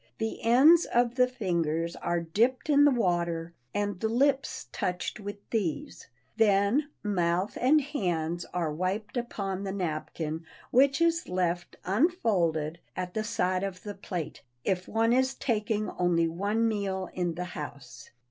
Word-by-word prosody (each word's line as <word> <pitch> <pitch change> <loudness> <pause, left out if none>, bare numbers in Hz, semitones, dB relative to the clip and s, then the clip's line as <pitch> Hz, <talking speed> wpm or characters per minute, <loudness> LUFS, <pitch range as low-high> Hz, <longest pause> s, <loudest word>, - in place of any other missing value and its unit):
The 220 0 -3
ends 280 +9 +6
of 240 0 +2
the 250 0 +4
fingers 170 -8 -1
are 170 0 -1
dipped 230 - +1
in 290 0 +6
the - - +7
water, 170 -7 0 0.2
and 205 -2 -2
the 220 - 0
lips 270 - +1
touched 180 +3 -3
with 205 0 -8
these; 195 -9 -2 0.3
then 215 +7 +3
mouth 180 -1 0
and 280 +5 +5
hands 175 - -2
are 170 -4 -1
wiped 190 - -2
upon 200 -5 -3
the 195 - -3
napkin 160 -3 -3 0.3
which 275 +4 +4
is 335 0 +2
left, 175 -1 -1
unfolded, 185 - +1 0.2
at 180 -1 -4
the 220 - -1
side 185 -4 0
of 190 -2 -5
the 205 - -5
plate, 180 -5 -5 0.2
if 185 -2 -1
one 225 +1 +2
is 260 +1 +2
taking 215 -3 -1
only 170 -2 +2
one 205 +7 0
meal 195 -4 -2
in 175 -2 -1
the 180 - -3
house. 135 -5 -8
195 Hz, 145 wpm, -28 LUFS, 175-235 Hz, 0.3 s, the